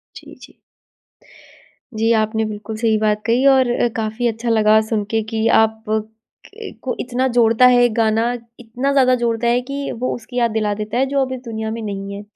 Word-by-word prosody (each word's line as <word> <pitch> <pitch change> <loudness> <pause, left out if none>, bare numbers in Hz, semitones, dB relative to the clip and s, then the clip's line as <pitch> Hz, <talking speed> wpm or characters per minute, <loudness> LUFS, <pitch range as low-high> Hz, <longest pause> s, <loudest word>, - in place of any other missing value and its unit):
जी - - -12
जी। - - -23 1.4
जी 225 +1 +2
आपने 220 0 0
बिल्कुल 215 +1 -6
सही 220 -1 +1
बात 210 -1 0
कही 240 +4 +2
और 260 -1 +3 0.3
काफ़ी 220 +2 -2
अच्छा 230 +1 -3
लगा 215 -1 +4
सुन 215 -3 0
के 225 0 +1
कि 220 0 0
आप 220 0 -1
क 215 0 -1 0.7
को 255 - -3
इतना 255 +1 -1
जोड़ता 235 -1 +3
है 245 -1 +5
ये 245 - +4
गाना, 220 -1 +2 0.4
इतना 245 +4 -3
ज़्यादा 260 -2 +4
जोड़ता 235 -1 -1
है 240 +1 +3
कि 275 +2 -5
वो 255 - -1
उसकी 245 +2 -9
याद 235 -2 +2
दिला 215 -1 -1
देता 215 +2 -4
है 265 - +2
जो 280 +1 -1
अब 260 -1 -2
इस 260 - -6
दुनिया 220 -1 -4
में 230 +1 -5
नहीं 200 -2 -5
है। 200 - -7
225 Hz, 200 wpm, -19 LUFS, 220-245 Hz, 1.4 s, है